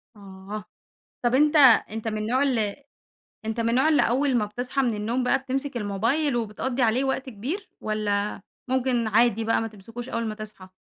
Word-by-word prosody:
آه، 200 +1 -8 0.6
طب 240 +1 +2
أنتَ 300 +3 +4 0.3
أنتَ 225 +1 -4
من 215 -1 -2
النوع 240 +6 +1
ال 225 -7 0 0.7
أنتَ 220 +1 -3
من 230 - +1
النوع 260 +6 +3
اللي 300 - +4
أول 265 +2 +2
ما 210 - +1
بتصحى 245 +5 -2
من 240 -3 +1
النوم 225 +5 -1
بقى 270 +2 +2
بتمسك 270 0 -3
الموبايل 235 +8 0
وبتقضِّي 240 +3 -2
عليه 240 +3 +3
وقت 265 0 -2
كبير، 290 - -5
والّا 210 -1 -1 0.3
ممكن 255 -3 +1
عادي 225 +1 +3
بقى، 225 - +2
ما 225 - -2
تمسكوش 225 +4 -9
أول 230 0 -2
ما 215 -1 -3
تصحى؟ 210 -3 -10
230 Hz, 180 wpm, -25 LUFS, 215-260 Hz, 0.7 s, أنتَ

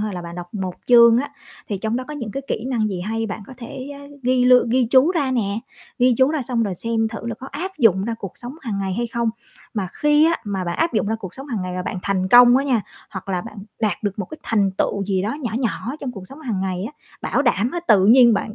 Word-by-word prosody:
hay 210 -2 -2
là 180 - -5
bạn 170 0 -8
đọc 175 +1 -9
1 190 -3 -3
chương 235 -1 +7
á, 285 +3 -2 0.4
thì 200 - -2
trong 220 +3 -1
đó 255 - -3
có 300 - -5
những 240 -7 -5
cái 275 - -4
kỹ 220 - -2
năng 235 -5 0
gì 190 -3 -4
hay, 225 +4 -2
bạn 210 0 -6
có - - -11
thể, 255 +2 -8
ơ, 280 - -10 0.2
ghi 250 0 +2
lương 250 -1 +6
ghi 250 +1 +2
chú 265 +5 +6
ra 295 -7 0
nè, 215 -4 -1 0.4
ghi 250 0 +4
chú 260 +3 +4
ra 310 -3 -1
xong 235 -2 0
rồi 200 -4 -1
xem 225 +3 0
thử 225 +1 -7
là 235 - -2
có 260 - -10
áp 350 +7 -4
dụng 195 -7 +4
ra 230 +1 -2
cuộc 195 -5 -6
sống 245 +1 -7
hàng 215 -6 -3
ngày 190 -1 -2
hay 240 +2 -1
không. 235 0 -1 0.4
Mà 195 -4 -2
khi 295 +1 +4
á, 335 - +2
mà 195 -3 -3
bạn 175 -1 -3
áp 330 +1 +1
dụng 215 - +1
ra 220 - 0
cuộc 190 -5 -8
sống 270 +1 -9
hàng 230 -9 -3
ngày 185 0 -4
và 180 - -2
bạn 185 +1 -4
thành 190 -2 0
công 245 +2 +8
á 275 - +1
nha, 255 -5 +2 0.3
hoặc 190 0 -8
là 185 -2 0
bạn 220 -2 -10 0.2
đạt 210 -6 +1
được 205 -1 -2
một 195 - -3
cái 310 - -10
thành 205 -4 +1
tựu 200 -1 0
gì 190 -1 0
đó 210 +6 -2
nhỏ 235 - -2
nhỏ 245 +1 -2
trong 260 -3 -4
cuộc 195 -5 -10
sống 280 +3 -12
hàng 225 -9 -3
ngày 185 -1 -2
á, 280 - -8 0.3
bảo - - +1
đảm 240 -3 +1
á, 345 - -3
tự 195 -3 +6
nhiên 235 0 +7
bạn 215 +1 -3
225 Hz, 285 wpm, -21 LUFS, 195-255 Hz, 0.4 s, công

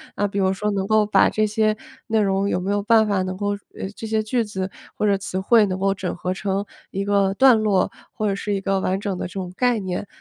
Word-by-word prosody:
那 205 - 0
比 200 - -2
如 190 -1 +2
说 210 +2 -1
能 195 -1 -1
够 215 0 +4
把 210 - +4
这 215 - +1
些 215 0 +1 0.3
内 220 -2 +2
容 195 0 +1
有 180 - 0
没 190 +2 -2
有 205 0 +1
办 220 +1 +4
法 200 -3 +1
能 185 0 -4
够 205 +2 -2 0.3
呃， 190 - -4
这 225 - -5
些 220 0 0
句 230 +2 0
子 190 -2 -4 0.2
或 - - -1
者 200 -1 +3
词 190 -1 -4
汇 220 +2 +5
能 185 -2 -2
够 195 +1 +1
整 190 -2 -4
合 180 +1 -2
成 195 +1 -2 0.2
一 195 - -3
个 200 -1 +2
段 245 0 +5
落？ 200 -4 +2 0.2
或 215 - -1
者 - - 0
是 205 +1 -3
一 195 - -1
个 195 0 0
完 190 0 0
整 200 -3 -2
的 - - -3
这 - - -13
种 185 -2 -5
概 245 -2 +2
念？ 190 +1 -4
200 Hz, 280 characters per minute, -22 LUFS, 190-215 Hz, 0.3 s, 汇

